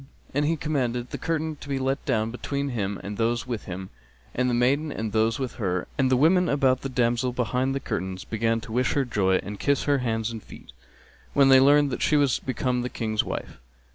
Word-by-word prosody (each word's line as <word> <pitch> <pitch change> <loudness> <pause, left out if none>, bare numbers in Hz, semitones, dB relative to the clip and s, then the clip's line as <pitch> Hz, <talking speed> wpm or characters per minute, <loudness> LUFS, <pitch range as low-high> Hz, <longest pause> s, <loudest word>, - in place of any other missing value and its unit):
and 145 +2 +1
he 165 +2 +1
commanded 125 -5 -2
the - - -3
curtain 160 -1 -2
to 145 - -12
be 135 - 0
let 135 +1 -1
down 110 -4 +1
between 140 +3 -3
him 100 -5 -2
and 100 0 -5
those 115 +1 0
with 120 -4 -4
him 95 0 -7 0.4
and 125 0 +1
the - - 0
maiden 140 +6 +2
and 110 -4 -3
those 110 +1 +2
with 130 -3 -4
her; 90 -3 -1
and 135 -2 +2
the 130 - +3
women 175 +6 +4
about 135 -2 +2
the 135 - -4
damsel 120 0 +1
behind 125 +2 -1
the - - 0
curtains 95 -6 -4
began 115 +1 0
to 110 - -10
wish 125 +2 +1
her 140 -2 +1
joy 95 -5 +1
and 100 0 -7
kiss 140 -1 +1
her 145 -1 +2
hands 115 -2 -1
and 115 -1 -6
feet, - - -13 0.6
when 140 -1 +5
they 135 0 +8
learned 145 +1 +5
that - - -3
she - - +3
was 140 -4 +2
become 125 -1 -1
the 125 - -3
King's 110 -3 -1
wife. - - -6
125 Hz, 225 wpm, -25 LUFS, 115-140 Hz, 0.6 s, they